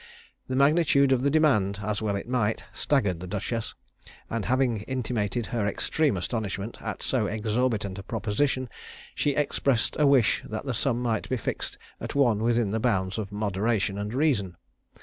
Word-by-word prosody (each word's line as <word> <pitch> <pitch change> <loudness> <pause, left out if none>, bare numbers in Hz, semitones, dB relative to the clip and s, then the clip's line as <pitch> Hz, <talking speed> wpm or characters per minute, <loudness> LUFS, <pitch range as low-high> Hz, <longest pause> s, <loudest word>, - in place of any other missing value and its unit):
The 130 - -2
magnitude 140 -1 +4
of 130 -2 +3
the 140 - +2
demand, 130 -11 +3
as 105 +1 -2
well 105 -2 0
it 100 - -4
might, 115 -3 0
staggered 100 - +1
the 90 - -7
duchess; 105 +4 -3 0.6
and 115 -2 -2
having 130 -1 +2
intimated 120 -4 -1
her 115 -4 -1
extreme 140 +4 +1
astonishment 105 +2 -3
at - - -5
so 120 -6 +1
exorbitant 110 -2 -1
a - - -5
proposition, 120 +6 -1 0.5
she 145 -2 0
expressed 140 -4 +1
a 150 - +5
wish 135 -5 +4
that 110 +4 -4
the 135 - -1
sum 120 0 0
might 115 -3 -1
be 130 - 0
fixed 110 - -4 0.2
at - - -6
one 120 -7 +3
within 115 -2 +1
the 110 - 0
bounds 95 -4 0
of 100 -2 -5
moderation 105 0 0
and 105 +1 -3
reason. 125 - +1
115 Hz, 170 wpm, -27 LUFS, 105-130 Hz, 0.6 s, a